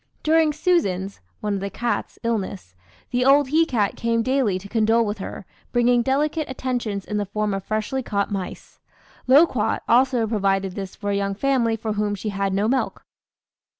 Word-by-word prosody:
"During 315 0 +4
'Susan's' 200 - 0 0.2
(one 210 -2 -1
of 200 - -1
the 200 +1 -3
cats) 240 +3 -3
illness, 200 - -3 0.4
the 250 0 +1
old 275 +1 +5
he 320 +3 +3
cat 215 -8 0
came 230 0 0
daily 255 -6 +1
to 195 +2 -9
condole 225 +2 +2
with 205 0 -3
her, 190 - -7 0.3
bringing 240 0 +3
delicate 295 +4 0
'attentions' 245 -6 -3
in 210 - -3
the 205 - -1
form 210 0 -1
of 195 -1 -3
freshly 215 +6 -2
caught 200 -5 -2
mice. 190 -3 -6 0.5
'Loquat' 260 -4 +4
also 245 -1 +3
provided 195 -3 0
this 195 -1 -6
for 205 -1 -3
a - - 0
young 200 0 -1
family 240 -1 +1
for 220 -1 -3
whom 210 0 -1
she 210 +2 -4
had 195 -1 -1
no 200 +2 +1
milk. 260 +3 -1
220 Hz, 180 wpm, -23 LUFS, 200-260 Hz, 0.5 s, old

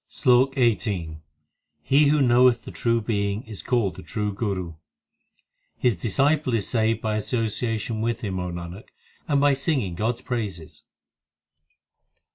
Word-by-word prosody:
SLOK 130 0 +3
XVIII 100 -10 0 0.6
He 140 - +4
who 145 0 +3
knoweth 125 -1 +4
the - - -7
True 115 -1 0
Being 105 -1 -1
is 110 -4 -8
called 120 -7 0
the - - -8
true 105 +6 -3
Guru 100 -4 -3
l; 80 -1 -15 1.0
His 120 -4 +2
disciple 135 - +1
is 105 -4 -1
saved 115 -1 +1
by 110 -1 -1
association 110 0 -2
with 115 +1 -1
him, 95 -5 -3
O 90 0 -3
Nanak, 85 +5 -7 0.4
and 145 -2 +2
by 145 0 +4
singing 135 - -1
God 110 +7 -1
s - - -14
praises. 90 -10 -5
115 Hz, 145 wpm, -24 LUFS, 100-125 Hz, 1.0 s, He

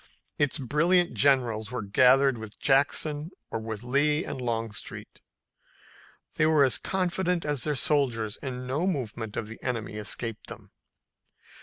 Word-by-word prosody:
Its 145 +1 +2
brilliant 170 +6 +2
generals 120 -6 +2
were 125 -3 -4
gathered 130 +6 +4
with 110 -1 -9
Jackson 145 +2 +1 0.2
or - - -2
with 110 -1 -6
Lee 150 +6 +1
and 130 - -5
Longstreet. 115 -3 -4 1.2
They 155 - +4
were 155 -3 +5
as 125 -6 +2
confident 180 -2 -1
as 145 -5 -1
their 150 -1 0
soldiers 125 -7 +1
and 125 -2 -6
no 145 +8 -1
movement 115 - -3
of 110 - -3
the 115 - -10
enemy 115 -4 -3
escaped 110 +2 -4
them. - - -10
130 Hz, 140 wpm, -27 LUFS, 115-150 Hz, 1.2 s, were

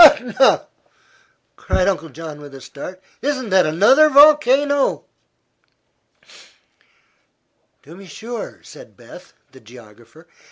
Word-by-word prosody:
'" - - +12
"Etna!" 270 -4 +4 0.9
cried 185 - -2
Uncle 165 -5 -3
John, 150 0 -11
with 145 -1 -13
a 135 - -13
start. 180 +8 -11 0.2
"Isn't 260 -4 -3
that 185 -3 +3
another 235 - +4
volcano?" 285 -1 +3 2.8
"To 165 - -15
be 195 +1 -15
sure," 225 +7 -9
said - - -16
Beth, - - -16 0.2
the - - -17
geographer. 120 +6 -18
190 Hz, 110 wpm, -18 LUFS, -, 2.8 s, '"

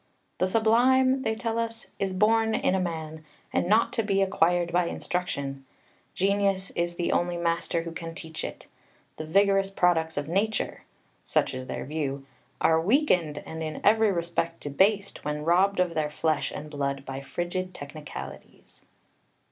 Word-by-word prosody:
"The 185 - +3
Sublime," 255 +5 +4
they 220 -3 0
tell 230 0 -2
us, 230 0 -4
"is 195 -1 0
born 220 +3 +3
in - - +1
a 190 - +2
man, 160 -3 -4 0.3
and - - +1
not 215 +4 +3
to - - +1
be 195 -2 +2
acquired 175 -2 +2
by 175 0 +3
instruction; 140 -8 -3 0.5
genius 195 0 +1
is 170 0 -2
the 175 - -1
only 175 0 +1
master 170 0 0
who 170 - -6
can 165 0 -7
teach 160 -3 -6
it. - - -6 0.5
The 155 - -5
vigorous 195 +3 +3
products 165 -4 +1
of 145 0 -2
nature" 205 +6 -1 0.4
(such - - +1
is 130 0 -6
their - - -4
view) 140 -2 -3 0.3
"are 160 0 +4
weakened 180 - +2
and 160 0 -6
in 155 -1 -4
every 220 0 +5
respect 170 -1 -2
debased, 195 +8 +1
when 150 0 -3
robbed 185 +3 +3
of 180 -2 +2
their 155 -2 0
flesh 155 0 0
and 150 0 -7
blood 140 -1 -2
by 135 0 -5
frigid 175 +5 -3
technicalities." 150 +1 -10
175 Hz, 160 wpm, -27 LUFS, 160-200 Hz, 0.5 s, every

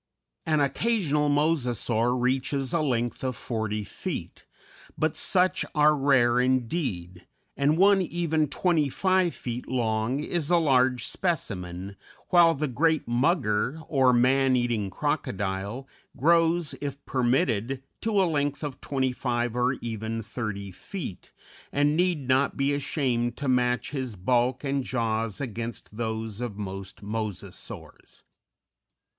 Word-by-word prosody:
An 155 -2 +3
occasional 150 -2 +1
Mosasaur 125 -5 +1
reaches 130 +1 0
a 170 - +2
length 120 -5 -1
of 130 -1 -1
forty 110 -2 -3
feet, - - -6 0.5
but 155 0 0
such 185 -1 +2
are 150 0 +5
rare 130 -4 +3
indeed, 120 - -1 0.3
and 145 +3 +2
one 195 +1 +5
even 165 -3 0
twenty 160 -1 +1
five 185 +3 +1
feet 120 0 -5
long 115 +1 0
is 155 0 -2
a 175 - +5
large 130 -6 +3
specimen, 100 - -3 0.3
while 170 -2 +6
the 150 +2 -1
great 160 +5 +1
Mugger, 125 - +1
or 135 -4 +4
Man 130 +2 +4
eating 120 -5 0
Crocodile, 100 +7 -2 0.3
grows, 165 +2 +3
if 140 -1 -5
permitted, 125 0 0 0.2
to 220 -2 +1
a 190 - +4
length 145 -3 -1
of 140 -3 -5
twenty 130 -2 0
five 120 -2 -2
or 125 +1 +2
even 115 -1 -4
thirty 105 -3 -5
feet, 115 - -7 0.4
and 145 +1 +2
need 170 -6 +1
not 130 +2 +2
be 140 +1 +1
ashamed 125 -4 -1
to 140 - -3
match 125 -1 +1
his 130 -6 -3
bulk 125 +7 +1
and 140 -1 0
jaws 115 -4 -1
against 115 -4 -5
those 110 -1 -3
of 115 -5 -4
most 95 -1 -7
Mosasaurs. 105 -2 -6
130 Hz, 125 wpm, -27 LUFS, 115-150 Hz, 0.5 s, while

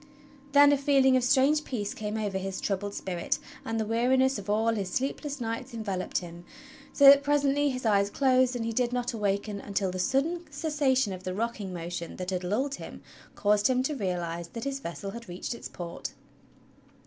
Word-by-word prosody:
Then 285 0 +8
a 285 - +3
feeling 270 -2 +4
of 255 - +2
strange 275 +4 +4
peace 210 -8 -3
came 210 0 -4
over 205 -3 -2
his 190 0 -4
troubled 200 0 -2
spirit, 175 -3 -2 0.3
and 225 0 -2
the 220 - 0
weariness 255 +3 +2
of 200 0 -9
all 220 +2 +2
his 200 -4 -2
sleepless 280 +2 -2
nights 235 +2 -4
enveloped 195 -5 -2
him; 175 -1 -6 0.5
so 280 - +4
that 280 0 +10
presently 285 0 +2
his 255 -2 -4
eyes 200 -2 +3
closed 255 +1 +3
and 230 -2 -2
he 230 - -2
did 245 +1 +1
not 245 0 -1
awaken 205 -1 -1
until 200 -2 -1
the 185 - -5
sudden 295 - 0
cessation 280 -7 +1
of 185 - -7
the 185 0 -4
rocking 220 -3 -3
motion 175 -1 -5
that 180 0 -4
had 180 -1 -2
lulled 245 +10 -1
him - - -9 0.3
caused 205 0 +3
him 255 0 +2
to 300 - -1
realize 175 -6 -3
that 230 +5 -7
his 275 0 -3
vessel 195 -2 -6
had 235 -1 -9
reached 175 +7 -4
its 235 - -7
port. 170 -1 -6
225 Hz, 195 wpm, -28 LUFS, 195-265 Hz, 0.5 s, that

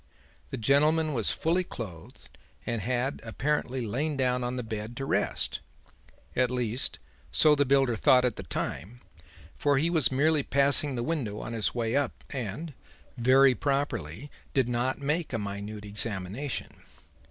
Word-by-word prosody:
The - - -4
gentleman 150 +6 +3
was 115 -5 0
fully 170 +3 +1
clothed 95 - -9 0.3
and 115 -2 -2
had 125 +5 -1
apparently 130 +1 -1
lain 140 +7 -1
down 125 -1 +1
on 125 +1 -2
the 125 - -3
bed 110 +1 -5
to 135 - -3
rest; - - 0 0.8
at 125 -1 +3
least 125 0 -2 0.3
so 155 - +5
the 145 -1 +3
builder 135 -3 +3
thought 125 +3 +5
at 125 - 0
the - - -6
time, 95 - -4 0.5
for 145 -1 +2
he 160 +5 +2
was 155 -8 +3
merely 150 +3 +3
passing 140 +1 +2
the 120 - -2
window 125 -9 -2
on 115 - -5
his 115 0 0
way 115 0 0
up, 140 -2 -1
and, 135 - -4 0.4
very 130 +2 +5
properly, 135 - -2 0.2
did 130 -3 +3
not 125 +2 0
make 150 +2 -1
a - - +1
minute 100 0 -5
examination. 105 +5 -2
125 Hz, 155 wpm, -28 LUFS, 115-140 Hz, 0.8 s, so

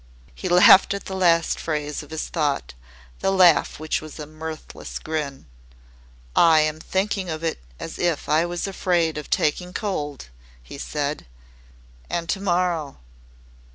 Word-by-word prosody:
He - - -5
laughed 180 +2 +7
at 200 - -7
the 190 - -5
last 170 -3 +3
phrase 150 -2 -3
of 150 - -13
his 160 0 -4
thought, 145 - -1 0.5
the - - +1
laugh 185 -7 +4
which 155 0 -1
was 155 -1 -10
a 150 - -6
mirthless 155 +1 -8
grin. 150 - -4 0.9
"I 160 -2 +6
am 155 0 -1
thinking 190 +1 -1
of 160 0 -4
it 165 - -1 0.2
as 165 - -7
if 170 -4 0
I 155 +2 +3
was 175 0 -3
afraid 175 -5 0
of 150 - -10
taking 180 +4 0
cold," 150 - -4 0.3
he 140 - -10
said. 145 - -3 0.8
"And 170 -1 -2
to - - 0
morrow 175 -6 0
160 Hz, 150 wpm, -23 LUFS, 150-180 Hz, 0.9 s, laughed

